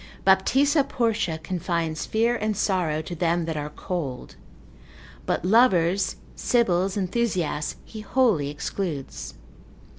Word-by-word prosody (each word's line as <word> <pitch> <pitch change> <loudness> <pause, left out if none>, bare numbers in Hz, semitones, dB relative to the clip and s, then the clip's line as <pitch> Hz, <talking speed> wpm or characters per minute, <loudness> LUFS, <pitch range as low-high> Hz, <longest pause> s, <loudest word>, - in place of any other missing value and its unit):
Baptista 270 +10 +4
Portia 225 -10 0
confines 165 -1 -2
fear 230 +2 +2
and 215 -2 -1
sorrow 175 -7 0
to 175 - -6
them 170 0 0
that 160 -1 -3
are 150 0 -3
cold; 150 -5 -5 0.9
but - - 0
lovers, 190 -4 +3 0.2
Sibyls, 195 -5 +1
enthusiasts, 185 -6 -1
he 220 - -9
wholly 215 - +2
excludes. 150 -1 -5
185 Hz, 110 wpm, -25 LUFS, 160-220 Hz, 0.9 s, Baptista